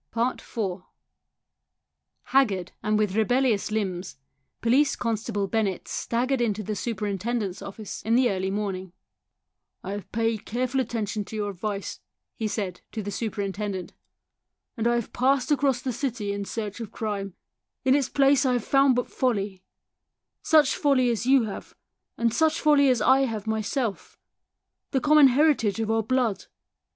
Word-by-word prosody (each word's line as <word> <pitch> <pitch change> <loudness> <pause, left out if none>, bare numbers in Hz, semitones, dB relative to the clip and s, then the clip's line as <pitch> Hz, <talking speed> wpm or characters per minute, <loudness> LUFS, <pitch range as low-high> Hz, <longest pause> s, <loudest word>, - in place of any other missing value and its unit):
IV 245 +1 -2 1.7
Haggard 205 -10 +1
and 215 0 +1
with 210 -2 0
rebellious 225 -1 +2
limbs, 190 -6 -3 0.4
Police 265 +5 +3
constable 220 -3 -2
Bennett 200 -3 -1
staggered 250 +2 -1
into 215 -2 0
the 215 +2 -3
super 210 +1 -3
intendent's 205 0 -2
office 200 +1 -7
in 225 +2 +1
the 250 -2 +4
early 190 0 -1
morning. 190 -3 -3 0.5
" - - -57
I 190 - -5
have 205 0 -6
paid 225 -1 0
careful 255 +3 -1
attention 220 -3 -2
to 220 - -9
your 205 -1 -2
advice," 200 +1 -4 0.4
he 220 - -2
said 200 -4 -4
to 220 - -3
the 205 - -4
superintendent, 200 -3 -3 0.8
"and 230 -2 0
I 240 - +3
have 235 -2 -3
passed 265 +3 +2
across 270 -3 +2
the 255 - -2
city 230 -5 -2
in 200 0 -4
search 210 0 -5
of 225 -3 -6
crime. 200 -4 -4 0.5
In 260 - +5
its 280 -2 +2
place 275 -1 +4
I 260 -2 +2
have 245 -3 -1
found 275 -2 +4
but 245 - 0
folly 200 -7 -1 0.8
such 300 -3 +4
folly 260 -4 +3
as 235 +1 -2
you 265 -2 +5
have, 210 -3 -7 0.6
such 315 +6 +2
folly 290 -2 +5
as 245 -4 +2
I 270 +3 +5
have 220 -4 -4
myself 220 +1 -2 0.7
the 265 - +1
common 300 +1 +6
heritage 260 -6 +2
of 225 0 0
our 225 0 +2
blood. 235 -2 0
225 Hz, 155 wpm, -26 LUFS, 205-255 Hz, 1.7 s, common